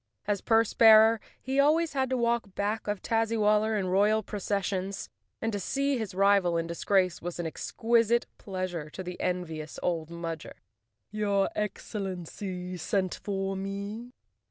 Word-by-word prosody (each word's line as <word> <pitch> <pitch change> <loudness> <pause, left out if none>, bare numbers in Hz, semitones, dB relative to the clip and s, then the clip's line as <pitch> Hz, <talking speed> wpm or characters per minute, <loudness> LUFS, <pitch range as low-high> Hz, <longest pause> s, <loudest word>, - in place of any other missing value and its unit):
As 205 -2 0
purse 225 -1 +3
bearer 220 0 +7 0.2
he 265 +2 -1
always 310 +2 +3
had 265 -2 0
to 260 - 0
walk 235 -4 0
back 210 +2 -2
of 205 -2 -2
Tazzywal¬ 220 -2 +2
ler 220 0 0
in 195 - -1
royal 205 +4 +3
processions, 200 -1 -2 0.3
and 225 0 -2
to 205 - -1
see 275 +8 0
his 210 -5 -5
rival 195 -3 +4
in 165 - -1
disgrace 185 +2 +1
was 175 0 -5
an 170 - -2
exquisite 230 +7 +1
pleasure 185 -5 -4
to 185 - -7
the 180 0 -7
envious 160 -4 -3
old 165 -3 -1
Mudger. 165 -2 -6 0.6
"Tour 200 -2 +1
Excellency 185 -3 -4
sent 185 +2 0
for 195 -1 -3
me?" 200 +5 -5
200 Hz, 150 wpm, -29 LUFS, 180-225 Hz, 0.6 s, bearer